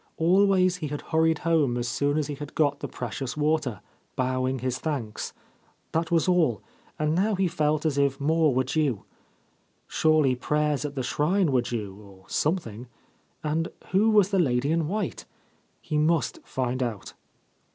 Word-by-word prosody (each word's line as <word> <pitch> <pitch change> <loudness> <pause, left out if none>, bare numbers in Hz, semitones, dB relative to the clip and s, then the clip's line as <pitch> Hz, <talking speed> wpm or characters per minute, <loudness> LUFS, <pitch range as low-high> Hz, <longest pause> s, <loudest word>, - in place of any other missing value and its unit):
Always 185 +1 +3
he 160 -4 -4
had 145 0 -4
hurried 160 0 +2
home 150 -7 +2
as 120 0 -2
soon 145 +5 0
as 155 - +1
he 150 - -4
had 145 0 -8
got 145 -2 +2
the - - -4
precious 125 +3 -5
water, 150 -8 0 0.3
bowing 130 0 0
his 130 +1 -2
thanks. 130 -9 -3 0.6
That 165 +1 0
was 170 -1 +2
all, 170 - +2 0.3
and 150 0 0
now 200 +5 +2
he 190 0 +1
felt 155 -2 0
as 145 -3 +1
if 140 -1 +1
more 155 +1 +3
were 130 +1 +2
due. 135 -5 0 0.8
Surely 155 -4 +3
prayers 150 +2 0
at 145 0 -5
the 130 - -2
shrine 160 +6 +1
were 130 -2 +3
due, 110 -5 -4
or 95 -2 -16
something; 130 - -2 0.6
and 160 +2 0 0.2
who 200 +4 +4
was 205 -2 +4
the 195 - +2
lady 135 -3 +1
in 165 -2 +1
white? 200 -1 -3 0.5
He 150 - -2
must 160 +1 +1
find 130 -1 -2
out. 115 -5 -4
150 Hz, 165 wpm, -26 LUFS, 130-165 Hz, 0.8 s, who